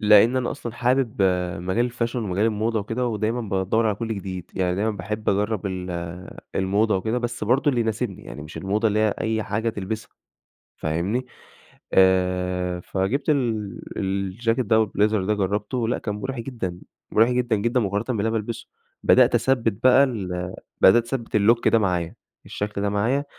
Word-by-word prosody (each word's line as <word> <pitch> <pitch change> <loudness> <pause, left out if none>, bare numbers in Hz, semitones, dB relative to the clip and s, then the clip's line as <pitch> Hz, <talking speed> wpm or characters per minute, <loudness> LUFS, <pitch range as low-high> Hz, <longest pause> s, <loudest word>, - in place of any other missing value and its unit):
لأن 105 +3 +6
أنا 125 -1 0
أصلًا 120 -5 -6
حابب 120 -3 +1 0.4
مجال 115 +7 0
الfashion 120 +1 -2
ومجال 105 -3 0
الموضة 110 0 0
وكده 115 +5 -2
ودايمًا 115 +1 -1
بادوّر 100 +2 0
على 105 - +1
كلّ 115 +2 -4
جديد، 95 -3 -6
يعني 90 -1 0
دايمًا 105 +3 +1
باحب 105 +2 -4
أجرّب 105 0 0
ال 90 -1 -4 0.6
الموضة 100 +3 +2
وكده، 110 +6 -1
بس 120 -2 -3
برضه 130 +7 +2
اللي 125 -3 0
يناسبني 110 -2 -2
يعني 75 - -8
مش 75 +2 -10
الموضة 105 +4 +1
اللي 105 0 0
هي 110 -1 +2
أي 110 0 0
حاجة 105 +3 -1
تلبِسها. 110 0 -4 0.7
فاهمني، 90 +11 -1 0.7
آآ 90 -1 +2
فجِبت 95 - -1
ال 115 -9 0 0.2
الجاكيت 100 +6 -1
ده 110 - +3
أو 110 0 +4
الblazer 105 +2 +1
ده 105 - +3
جرّبته. 105 +4 -1
لأ - - +1
كان 105 - -3
مُريح 130 +4 -4
جدًا، 115 -8 -5 0.3
مُريح 115 +3 +4
جدًا، 125 -2 +1
جدًا، 120 +5 +1
مقارنةً 100 0 -1
باللي - - 0
أنا 115 - 0
بالبِسه. 115 +2 -5 0.4
بدأت - - +5
أثبّت 115 -6 +1
بقى 130 +2 +7
ال 95 -8 -3 0.3
بدأت 115 +5 +7
أثبّت 120 -2 -2
الlook 115 +3 +4
ده 115 - +4
معايا، 90 -5 -1 0.3
الشكل 105 -1 -4
ده 100 - +1
معايا 115 +8 0
110 Hz, 170 wpm, -24 LUFS, 95-120 Hz, 0.7 s, بقى